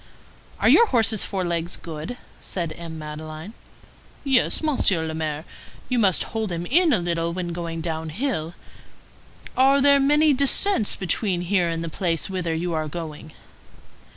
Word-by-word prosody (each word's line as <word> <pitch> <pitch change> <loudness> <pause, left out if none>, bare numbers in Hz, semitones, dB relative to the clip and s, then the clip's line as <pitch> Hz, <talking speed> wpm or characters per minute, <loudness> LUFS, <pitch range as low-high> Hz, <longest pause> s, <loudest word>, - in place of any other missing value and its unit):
"Are - - +2
your 470 - +7
horse's 225 - +3
forelegs 175 -3 -2
good?" 160 +8 -7 0.2
said 170 -4 -4
M. 165 -1 -8
Madeleine. 155 +4 -8 0.7
"Yes, 270 +2 +2
Monsieur 200 - +2
le 160 - -4
Maire. 155 0 -3 0.4
You 250 -1 +1
must 195 -5 +3
hold 220 -3 -2
him 170 0 -3
in 330 - +3
a - - +4
little 170 -1 -1
when 180 -1 -4
going 165 -1 -4
down 160 -1 -4
hill. 175 - -3 1.0
Are 270 +2 +5
there 280 0 +5
many 295 +2 +4
descends 275 - +3
between 185 -1 -1
here 180 -1 +1
and 165 0 -3
the - - -4
place 165 +1 -2
whither 175 -3 -2
you 170 +1 -2
are 155 -1 -1
going?" 155 -1 -7
175 Hz, 155 wpm, -23 LUFS, 160-235 Hz, 1.0 s, your